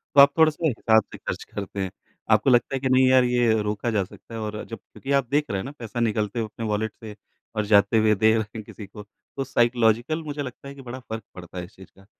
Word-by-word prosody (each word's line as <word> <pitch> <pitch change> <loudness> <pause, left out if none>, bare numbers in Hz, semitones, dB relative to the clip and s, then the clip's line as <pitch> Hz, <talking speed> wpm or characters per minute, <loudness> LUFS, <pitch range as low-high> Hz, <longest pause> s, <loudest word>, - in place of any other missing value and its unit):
तो 140 - +10
आप 140 0 +7
थोड़ा-से 160 +1 +3
हिसाब 110 -4 +3
से - - -8
ख़र्च - - -5
करते 100 0 -5
हैं। 95 - -3 0.4
आपको 110 +4 +4
लगता 120 +1 +3
है 135 - -1
कि 130 -1 -1
नहीं 130 0 +5
यार 130 -1 +6
ये 120 -2 +2
रोका 105 +3 -2
जा 105 -3 +1
सकता 105 - -14
है 115 - -4
और 105 0 -4
जब 115 - -6
क्योंकि 135 - -9
आप 140 -3 +2
देख 150 +1 +2
रहे 100 - -1
हैं - - -4
ना 135 - -6
पैसा 115 0 -5
निकलते 110 -1 0
हुए 115 - 0
अपने 110 +1 -7
वॉलेट 105 +1 -1
से 105 -2 -8 0.4
और 105 -1 0
जाते 100 +1 +4
हुए 110 0 +4
दे 110 +3 +4
रहे 110 - +2 0.2
हैं 110 - -6
किसी 105 0 -10
को, 105 +1 -11 0.3
तो 135 - 0
साइकोलॉजिकल 120 +4 +2
मुझे 145 -1 -5
लगता 135 0 -8
है 140 - -9
कि 135 - -11
फ़र्क 120 -3 -7
पड़ता 90 0 -10
है 90 - -3
इस 105 - -19
चीज़ 95 - -14
का। 95 - -18
115 Hz, 260 wpm, -24 LUFS, 105-130 Hz, 0.4 s, तो